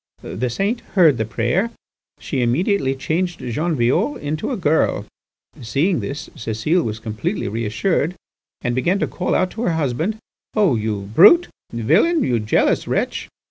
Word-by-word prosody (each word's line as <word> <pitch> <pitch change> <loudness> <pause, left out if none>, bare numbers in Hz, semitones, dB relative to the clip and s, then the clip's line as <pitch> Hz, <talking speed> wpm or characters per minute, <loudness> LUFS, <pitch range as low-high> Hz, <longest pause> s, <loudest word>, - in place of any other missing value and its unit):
"The 120 +6 -3
saint 200 - -1 0.2
heard 160 -9 +5
the 110 - 0
prayer. 120 - 0 0.5
She 135 - -2
immediately 135 - +1
changed 170 +6 -2
Jean 155 +8 -2
Violle 125 +4 +1
into 150 +2 -3
a 255 - -2
girl. 160 -4 +1 0.6
Seeing 150 - +1
this, 145 +4 -5
Cécile 115 +11 -1
was 110 -1 -3
completely 110 - -3
reassured, 115 - -1 0.5
and 120 - 0
began 175 +10 +1
to - - 0
call 180 - -2
out 185 - +1
to 225 - -6
her 180 -8 +1
husband: 160 - -1 0.4
'Oh! 200 - +3
you 110 -2 -2
brutal 335 - +7 0.2
villain, 175 - +2
you 120 -2 +1
jealous 105 0 +1
wretch! - - -2
150 Hz, 150 wpm, -20 LUFS, 120-185 Hz, 0.6 s, brutal